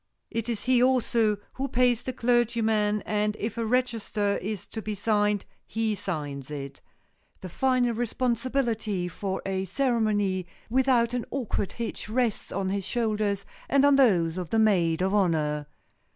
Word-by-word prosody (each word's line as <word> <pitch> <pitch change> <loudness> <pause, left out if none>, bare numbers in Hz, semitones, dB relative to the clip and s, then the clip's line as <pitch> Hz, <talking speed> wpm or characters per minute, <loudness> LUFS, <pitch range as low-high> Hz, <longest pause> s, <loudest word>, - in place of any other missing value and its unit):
It 230 +1 -2
is 230 -3 -2
he, 255 -1 +3
also, 235 -4 +3 0.2
who 270 +1 -2
pays 245 -2 +2
the 255 - -4
clergyman 225 -4 +1
and 210 0 0
if 220 +1 -3
a 230 - -2
register 225 -4 0
is 205 -1 -4
to 220 - -5
be 215 0 -4
signed, 205 -1 +1 0.2
he 225 -1 0
signs 145 -9 -4
it. 140 -2 -7 0.6
The 185 - -6
final 255 +3 +2
responsibility 235 -4 -1
for 190 +2 -4
a 190 0 -1
ceremony 205 -5 0 0.2
without 250 -2 +3
an 245 -2 -1
awkward 240 -7 -2
hitch 230 -2 -5
rests 235 -1 -1
on 190 0 -1
his 200 0 -1
shoulders 210 -3 -1 0.2
and 280 0 +4
on 285 -1 +6
those 185 -11 +3
of 175 -3 -5
the 225 - +1
maid 180 -6 +3
of 190 +1 +1
honor. 155 -7 +1
215 Hz, 150 wpm, -27 LUFS, 195-240 Hz, 0.6 s, on